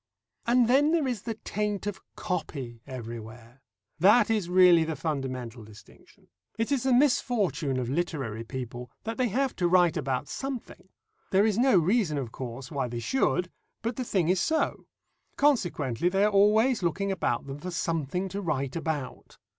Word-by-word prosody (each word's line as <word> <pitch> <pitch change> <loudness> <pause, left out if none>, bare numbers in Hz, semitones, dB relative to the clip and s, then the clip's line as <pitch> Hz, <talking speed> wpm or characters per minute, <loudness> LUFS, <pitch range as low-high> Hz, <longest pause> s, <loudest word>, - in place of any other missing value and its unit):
And 240 0 +4
then 285 +6 +4
there 320 -5 +2
is 240 -6 -2
the 225 0 -4
taint 210 -2 -3
of 205 -2 -4
"copy" 135 - -4
everywhere. 115 0 -9 0.4
That 210 +6 +5
is 210 -6 0
really 180 -2 +6
the 160 0 -3
fundamental 130 -5 -4
distinction. 105 0 -17 0.3
It 225 +4 -1
is 275 -3 +2
the 265 - +1
misfortune 220 - +2
of 125 -2 -2
literary 135 -7 -2
people, 125 0 -6
that 225 0 -4
they 255 - +2
have 260 +5 0
to 175 - +2
write 175 -2 +4
about 135 -1 -2
something. 265 -8 -6 0.4
There 195 +2 +4
is 220 0 +1
no 255 -4 +5
reason, 180 -2 +2
of 130 -5 -4
course, 130 +2 -7
why 140 -4 -1
they 120 0 -5
should, 180 - 0 0.3
but 230 +1 -2
the 255 - -3
thing 190 -8 0
is 185 0 +2
so. 320 0 0 0.5
Consequently, 175 - +1
they 195 +2 +2
are 210 - +3
always 215 +4 +4
looking 185 +3 -1
about 155 -10 -1
them 135 +1 -7
for 180 - -6
something 165 +1 -2
to 200 +2 -4
write 140 -7 -2
about. 160 -5 -4
175 Hz, 170 wpm, -28 LUFS, 135-220 Hz, 0.5 s, really